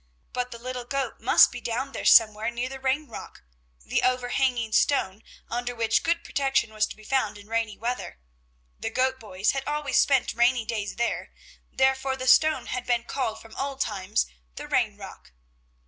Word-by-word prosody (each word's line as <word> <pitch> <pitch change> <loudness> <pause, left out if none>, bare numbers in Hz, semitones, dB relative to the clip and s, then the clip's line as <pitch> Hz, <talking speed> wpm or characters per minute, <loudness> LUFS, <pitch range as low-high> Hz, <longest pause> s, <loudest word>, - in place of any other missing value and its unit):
But 250 0 -2
the 235 - -8
little 250 +1 -5
goat 270 -2 -3
must 240 - +6
be 245 - -7
down 250 +4 -3
there - - -6
somewhere 220 0 +6
near 240 +1 -3
the 270 0 -7
Rain 270 +3 0
rock, - - -10 0.4
the - - 0
overhanging 250 -2 +1
stone 210 -8 +2 0.3
under 245 +1 -3
which 230 -1 +2
good 335 0 0
protection 270 -5 0
was 215 -1 +1
to - - -9
be 215 - -17
found 220 -3 0
in 205 0 -14
rainy 225 -2 -2
weather; 235 - -4 0.6
the - - -3
goat 260 0 0
boys 200 -3 -1
had 270 0 -4
always 295 -1 +1
spent 270 -3 +3
rainy 240 0 +2
days 215 -2 -3
there, 235 +1 -2 0.4
therefore 265 0 +1
the 255 -1 -5
stone 310 +4 +4
had 250 -1 -4
been 240 -1 +1
called 235 -3 -3
from 225 0 -14
old 275 0 -3
times 205 -4 0 0.3
the - - -7
Rain - - +1
rock. - - -12
245 Hz, 180 wpm, -26 LUFS, 225-265 Hz, 0.6 s, must